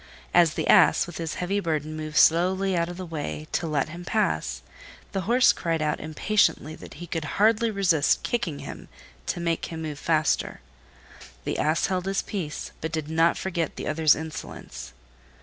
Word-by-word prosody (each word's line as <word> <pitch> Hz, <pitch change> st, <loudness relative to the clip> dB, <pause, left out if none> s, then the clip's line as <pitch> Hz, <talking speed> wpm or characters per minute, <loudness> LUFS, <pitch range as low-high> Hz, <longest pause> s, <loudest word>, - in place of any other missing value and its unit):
As 170 Hz, -3 st, +5 dB
the -, -, -2 dB
Ass -, -, +6 dB
with 175 Hz, -2 st, -8 dB
his 165 Hz, -2 st, -3 dB
heavy 185 Hz, +3 st, -1 dB
burden 155 Hz, -4 st, -2 dB
moved 155 Hz, -1 st, -4 dB
slowly 185 Hz, +3 st, +4 dB
out 170 Hz, 0 st, 0 dB
of 175 Hz, -, -7 dB
the 185 Hz, -, -5 dB
way 155 Hz, -2 st, -5 dB
to 170 Hz, -, -1 dB
let 150 Hz, -2 st, 0 dB
him 170 Hz, +2 st, -8 dB
pass, 80 Hz, -, -1 dB, 0.5 s
the 195 Hz, +1 st, -3 dB
Horse 250 Hz, +2 st, +6 dB
cried 165 Hz, -2 st, -1 dB
out 150 Hz, -1 st, 0 dB
impatiently 155 Hz, -1 st, +1 dB
that -, -, -11 dB
he 175 Hz, +4 st, -8 dB
could 165 Hz, -2 st, -3 dB
hardly 225 Hz, +2 st, +4 dB
resist 190 Hz, -8 st, +2 dB
kicking 190 Hz, -12 st, -1 dB
him -, -, -9 dB, 0.4 s
to -, -, -1 dB
make 170 Hz, -1 st, -1 dB
him 160 Hz, -1 st, -6 dB
move 150 Hz, -2 st, -5 dB
faster. 160 Hz, -2 st, +1 dB, 0.8 s
The -, -, -2 dB
Ass 155 Hz, +2 st, +2 dB
held 185 Hz, -1 st, -1 dB
his 195 Hz, 0 st, 0 dB
peace, 170 Hz, -8 st, -5 dB
but 160 Hz, -, -3 dB
did 160 Hz, -2 st, -3 dB
not 165 Hz, +1 st, +3 dB
forget 170 Hz, -4 st, -2 dB
the -, -, -6 dB
other's 155 Hz, 0 st, +4 dB
insolence. 65 Hz, -, -8 dB
165 Hz, 180 wpm, -26 LUFS, 155-185 Hz, 0.8 s, Ass